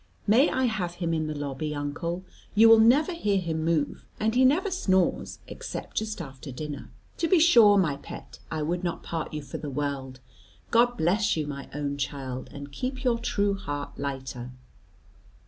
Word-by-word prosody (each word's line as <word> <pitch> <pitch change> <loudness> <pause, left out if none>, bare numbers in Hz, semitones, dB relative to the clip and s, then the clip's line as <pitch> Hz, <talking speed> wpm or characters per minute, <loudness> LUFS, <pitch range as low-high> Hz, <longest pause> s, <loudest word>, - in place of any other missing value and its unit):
May 230 +7 +5
I 260 - 0
have 190 -7 -1
him 170 -2 -1
in 155 -1 0
the 155 -1 -4
lobby, 145 +1 -3
uncle, 170 +5 -3 0.3
you 225 +2 +8
will 225 0 +9
never 275 +10 +5
hear 210 -12 +1
him 160 -3 -2
move, 160 -3 0
and 220 +1 +1
he 255 +2 +4
never 325 +10 +3
snores 190 - +1
except - - -7
just 215 -1 -2
after 135 -3 -8
dinner?" 145 +2 -6 0.3
"To 330 - +1
be 370 - +5
sure, 235 -11 +7
my 160 -7 +2
pet; - - -10
I 155 -1 -2
would 175 +4 -1
not 175 -2 -3
part 165 -2 -4
you 150 -1 -5
for - - -7
the 150 - -5
world. 135 -2 -3 0.5
God 240 +1 +4
bless 200 +3 +2
you, 155 - -1
my 140 -1 -6
own 140 -1 -2
child, 135 -2 -4
and 140 0 -8
keep 255 - -4
your 240 -2 +2
true 205 -4 +1
heart 145 -7 -5
lighter." 130 -3 -4
170 Hz, 180 wpm, -27 LUFS, 145-220 Hz, 0.5 s, will